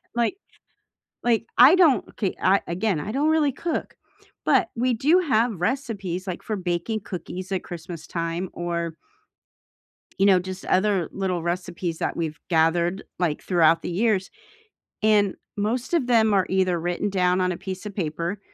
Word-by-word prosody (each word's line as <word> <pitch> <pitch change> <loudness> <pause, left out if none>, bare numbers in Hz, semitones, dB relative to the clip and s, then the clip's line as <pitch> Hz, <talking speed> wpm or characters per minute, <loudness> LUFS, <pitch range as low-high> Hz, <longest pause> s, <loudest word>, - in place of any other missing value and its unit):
like 240 - 0 0.9
like, 230 -1 +2
I 305 - +9
don't, 335 -8 +4
okay 195 -4 -2
I 195 +1 +4
again, 185 -1 0
I 200 - -5
don't 280 +6 +1
really 310 -3 +3
cook, 330 +5 -4 0.5
but 340 - +3
we 250 +1 +1
do 295 +10 +4
have 230 - +1
recipes, 200 -5 -2
like, 180 - -4
for 220 - -3
baking 185 +4 -2
cookies 185 0 -6
at 185 - -2
Christmas 170 -1 -8
time, 170 +2 -3
or 170 -1 -3 1.2
you 195 - +5
know, 190 -2 +6
just 185 +1 -7
other 190 -2 +2
little 185 -3 -2
recipes 175 -1 -3
that - - -2
we've 155 -3 -3
gathered, 170 +3 +2
like, 165 -5 -1
throughout 165 -3 +3
the - - -4
years, 195 +1 +1 0.7
and 210 -2 +3 0.2
most 235 +9 -1
of 295 -7 +2
them 220 -4 +4
are 190 -2 +3
either 185 -2 +1
written 175 +4 -1
down 180 -1 +2
on 180 0 +1
a - - -4
piece 190 +2 -7
of 205 - -6
paper, 170 +2 -3
190 Hz, 160 wpm, -24 LUFS, 175-220 Hz, 1.2 s, I